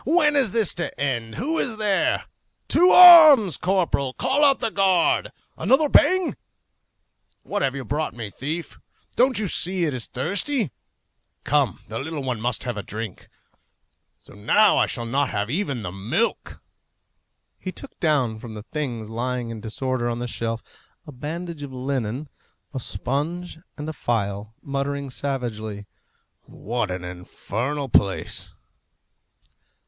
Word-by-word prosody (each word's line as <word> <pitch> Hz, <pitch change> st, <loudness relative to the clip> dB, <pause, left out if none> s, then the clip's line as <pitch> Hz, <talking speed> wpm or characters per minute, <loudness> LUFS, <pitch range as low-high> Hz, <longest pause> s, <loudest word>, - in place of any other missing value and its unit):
When 300 Hz, -1 st, +3 dB
is 270 Hz, -6 st, +3 dB
this 220 Hz, -1 st, +1 dB
to 175 Hz, -, -5 dB
end? 120 Hz, -5 st, -2 dB
Who 315 Hz, +7 st, -1 dB
is 225 Hz, -3 st, -2 dB
there? 210 Hz, -3 st, +1 dB, 0.4 s
To 360 Hz, +2 st, +5 dB
arms! 310 Hz, -, +10 dB
Corporal, 180 Hz, -8 st, 0 dB
call 265 Hz, -, +1 dB
out 275 Hz, -2 st, +5 dB
the 225 Hz, -, -1 dB
guard! 190 Hz, -4 st, +2 dB, 0.3 s
Another 295 Hz, +4 st, +3 dB
bang! 370 Hz, +4 st, +4 dB, 1.1 s
What 205 Hz, -, -3 dB
have 135 Hz, 0 st, 0 dB
you 135 Hz, -2 st, -5 dB
brought 150 Hz, -1 st, -2 dB
me, 110 Hz, -4 st, -6 dB
thief! 160 Hz, -, -5 dB, 0.4 s
Don't 255 Hz, +1 st, +3 dB
you 215 Hz, -1 st, +1 dB
see 180 Hz, 0 st, 0 dB
it 150 Hz, -, -1 dB
is 125 Hz, -2 st, -4 dB
thirsty? 200 Hz, -, -1 dB, 0.7 s
Come! -, -, +1 dB
the 110 Hz, +1 st, -5 dB
little 150 Hz, 0 st, -5 dB
one 125 Hz, -4 st, -3 dB
must 120 Hz, -1 st, -1 dB
have 120 Hz, -3 st, -4 dB
a -, -, -2 dB
drink. 105 Hz, 0 st, -7 dB, 0.9 s
So -, -, -17 dB
now 195 Hz, -, +4 dB
I -, -, +3 dB
shall 120 Hz, -3 st, -3 dB
not 135 Hz, +3 st, 0 dB
have 105 Hz, +3 st, -2 dB
even 140 Hz, -, -2 dB
the 90 Hz, -, -4 dB
milk!" 115 Hz, -, -2 dB, 1.0 s
He 185 Hz, -, -5 dB
took 275 Hz, -, -11 dB
down 140 Hz, -, +1 dB
from 115 Hz, -2 st, -9 dB
the 105 Hz, -, -8 dB
things 120 Hz, -5 st, -4 dB
lying 120 Hz, +1 st, -3 dB
in 110 Hz, -2 st, -7 dB
disorder 120 Hz, +2 st, -2 dB
on 120 Hz, -, -2 dB
the 120 Hz, -, -4 dB
shelf 115 Hz, -1 st, -3 dB, 0.4 s
a 150 Hz, -, -10 dB
bandage 160 Hz, +4 st, -6 dB
of 140 Hz, -2 st, -7 dB
linen, 130 Hz, 0 st, -3 dB, 0.5 s
a 135 Hz, -, -3 dB
sponge 160 Hz, +8 st, -3 dB, 0.2 s
and 150 Hz, 0 st, -6 dB
a 155 Hz, -, -4 dB
phial, 105 Hz, -4 st, -3 dB
muttering 140 Hz, 0 st, -3 dB
savagely, 110 Hz, -7 st, -4 dB, 0.6 s
"What 115 Hz, -1 st, -3 dB
an 90 Hz, -1 st, -4 dB
infernal 115 Hz, +10 st, -4 dB
place!" 100 Hz, -5 st, 0 dB
140 Hz, 145 wpm, -23 LUFS, 115-185 Hz, 1.1 s, arms